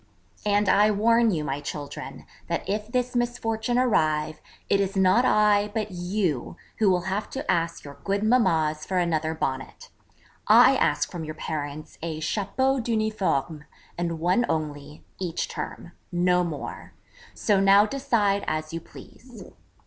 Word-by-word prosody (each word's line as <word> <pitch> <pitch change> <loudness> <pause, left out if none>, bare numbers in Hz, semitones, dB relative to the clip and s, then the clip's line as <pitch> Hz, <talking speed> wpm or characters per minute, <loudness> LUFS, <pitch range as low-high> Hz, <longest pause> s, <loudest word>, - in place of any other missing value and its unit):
And 205 0 +2
I 210 +2 +5
warn 230 +3 +3
you, 165 -7 -1
my 140 -1 -3
children, 145 -1 -7 0.2
that - - -3
if 210 +2 -2
this 250 0 -1
misfortune 240 -1 -1
arrive, 155 -10 +1 0.3
it 200 - +2
is 195 0 -1
not 190 +6 +4
I, 210 -2 +3
but 215 -2 -2
you, 180 - -2 0.2
who 215 -3 +4
will 180 -1 +2
have 190 +4 -3
to 270 - -5
ask 165 -1 -1
your 140 -1 -11
good 200 +1 -1
mammas 165 -10 +2
for 185 - -2
another 160 -2 0
Bonnet. 135 -4 -4 0.6
I - - +7
ask - - +1
from 170 - -5
your 155 0 -6
parents 155 -1 -6
a 160 -1 -4
chapeau 225 +11 0
d'uniforme, 215 - -1 0.3
and 170 -1 -2
one 180 +8 +2
only, 150 -1 -4 0.2
each 175 -3 -2
term: 175 - -7 0.2
no 180 0 +2
more. 160 -5 -6 0.4
So 205 -3 +2
now 195 +1 +6
decide 215 -6 0
as 155 0 -3
you 165 - -4
please.' 245 +7 -14
190 Hz, 150 wpm, -25 LUFS, 155-215 Hz, 0.6 s, I